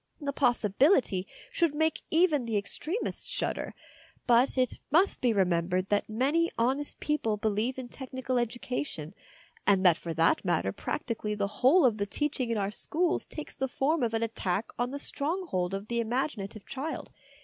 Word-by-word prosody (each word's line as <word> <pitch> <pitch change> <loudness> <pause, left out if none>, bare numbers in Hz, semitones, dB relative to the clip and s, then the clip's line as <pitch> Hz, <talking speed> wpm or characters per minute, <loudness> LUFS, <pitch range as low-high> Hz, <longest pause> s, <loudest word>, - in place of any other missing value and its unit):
The 280 -2 -3
possibility 240 - +3 0.2
should 335 -4 +1
make 315 +1 +1
even 320 -6 +3
the 225 -2 0
extremists 310 - -3
shudder, - - -3 0.5
but 245 +3 +4
it 255 -1 +1
must 350 +7 +3
be 245 - +3
remembered 185 -1 +1
that 205 +1 +1
many 285 +10 +2
honest 265 +5 0
people 230 -8 0
believe 220 +5 0
in 260 -2 -5
technical 260 0 -3
education, 240 - -3 0.5
and 195 -2 +4
that 170 -2 +7
for 165 -1 -5
that 165 +1 +3
matter 170 - +1
practically 210 - -3
the 205 0 -3
whole 275 +6 +6
of 230 -4 +3
the 200 -1 -1
teaching 270 0 -1
in 230 - 0
our 200 0 -1
schools 340 - 0
takes 305 - -7
the 265 - -2
form 295 +5 0
of 230 -2 0
an 225 - 0
attack 210 -2 -2
on 245 0 +1
the 280 - -4
stronghold 285 - -1
of 195 +2 -6
the 235 0 0
imagina 235 -3 -2
tive 215 -1 -12
child. 275 +4 -5
240 Hz, 170 wpm, -29 LUFS, 205-285 Hz, 0.5 s, that